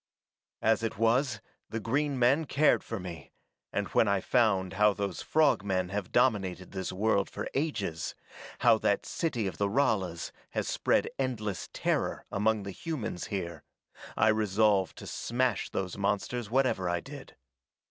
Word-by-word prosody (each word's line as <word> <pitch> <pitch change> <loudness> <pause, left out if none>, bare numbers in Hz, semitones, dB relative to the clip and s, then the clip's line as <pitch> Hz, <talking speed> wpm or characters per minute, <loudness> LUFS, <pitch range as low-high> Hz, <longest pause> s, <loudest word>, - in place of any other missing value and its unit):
"As 110 +1 +3
it 115 -3 -3
was, 115 +1 +2 0.3
the 115 - -3
green 140 +5 0
men 130 +6 +3
cared 150 +2 +3
for 115 - -5
me, 85 -5 -8 0.4
and - - -1
when - - +3
I 100 -1 +2
found 95 -4 +2
how 105 +1 +4
those 100 -4 -3
frog 155 -10 +3
men 95 -2 0
have 100 -1 -4
dominated 95 -7 +1
this 95 -2 -4
world 100 +1 +1
for - - -5
ages, 110 - -2 0.5
how - - +5
that - - +1
city 125 -10 -1
of 95 -4 -4
the 100 0 +2
Ralas 95 -8 0 0.3
has - - 0
spread - - +1
endless 110 -7 -2
terror - - -1
among 105 +1 +1
the 100 - -5
humans 120 - -4
here, 85 -5 -4 0.6
I 110 - +5
resolved 105 -2 +2
to - - -9
smash 120 -3 -1
those 95 +1 -3
monsters 100 +3 -1
whatever 125 -8 +1
I 85 0 0
did. - - -11
105 Hz, 155 wpm, -30 LUFS, 95-120 Hz, 0.6 s, how